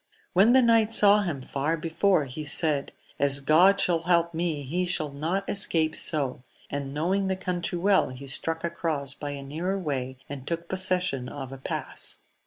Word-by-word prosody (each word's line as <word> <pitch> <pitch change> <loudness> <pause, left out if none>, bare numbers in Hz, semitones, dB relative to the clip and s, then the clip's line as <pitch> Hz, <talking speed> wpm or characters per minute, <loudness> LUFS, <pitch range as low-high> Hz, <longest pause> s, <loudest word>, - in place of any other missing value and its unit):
When 200 +7 +5
the 260 -1 +6
knight 225 -2 +4
saw 210 -1 +7
him 155 -9 -4
far 145 +5 -2
before, 165 +1 +1
he 140 +4 -7
said. 150 -1 -1 0.3
As 140 0 +3
God 175 +8 +4
shall 180 -4 +2
help 170 0 +1
me, 160 -3 -2
he 170 +7 -2
shall 155 -4 -1
not 165 +8 -2
escape 160 -5 +1
so! 140 -5 -1 0.3
and 140 -1 -4
knowing 185 +7 0
the 190 - 0
country 180 -2 -3
well, 195 +2 +3
he 130 +2 -9
struck 165 +4 -2
across 160 -5 -1
by 145 - -6
a 140 -1 -6
nearer 165 +8 -3
way, 130 -7 -3
and 140 -2 -8
took 170 0 -3
pos 190 +1 +1
session 180 -9 0
of 135 -2 -7
a 135 - -9
pass. - - -4
165 Hz, 185 wpm, -26 LUFS, 140-185 Hz, 0.3 s, saw